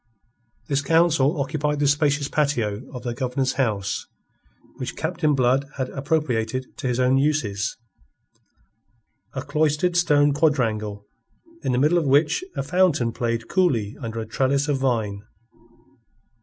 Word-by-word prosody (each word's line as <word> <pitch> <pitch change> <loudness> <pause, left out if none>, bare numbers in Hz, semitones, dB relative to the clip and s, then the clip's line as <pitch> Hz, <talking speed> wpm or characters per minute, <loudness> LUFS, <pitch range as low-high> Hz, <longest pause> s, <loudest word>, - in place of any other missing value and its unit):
This 140 -1 +1
council 160 -1 +3
occupied 150 +1 -1
the 145 - +2
spacious 145 0 +2
patio 125 -7 -1
of 125 -3 -8
the 120 -2 -3
Governor's 130 +1 -1
house 105 -6 -1 0.7
which 130 - -5
Captain 160 -2 0
Blood 130 +1 +2
had 130 -2 -2
appropriated 130 -4 -2
to - - -3
his 125 0 -1
own 130 +1 +3
uses 115 -8 0 1.6
a 130 - -3
cloistered 150 +4 +1
stone 145 -4 +4
quadrangle 110 -9 0 0.6
in - - 0
the 125 - +1
middle 150 +7 +3
of 155 - -2
which 150 - +3
a - - -2
fountain 155 -6 +2
played 115 0 -2
coolly 125 - +1
under 115 -2 -4
a 110 - -4
trellis 135 +5 0
of 145 -2 +1
vine. 110 -6 -1
135 Hz, 135 wpm, -23 LUFS, 120-150 Hz, 1.6 s, stone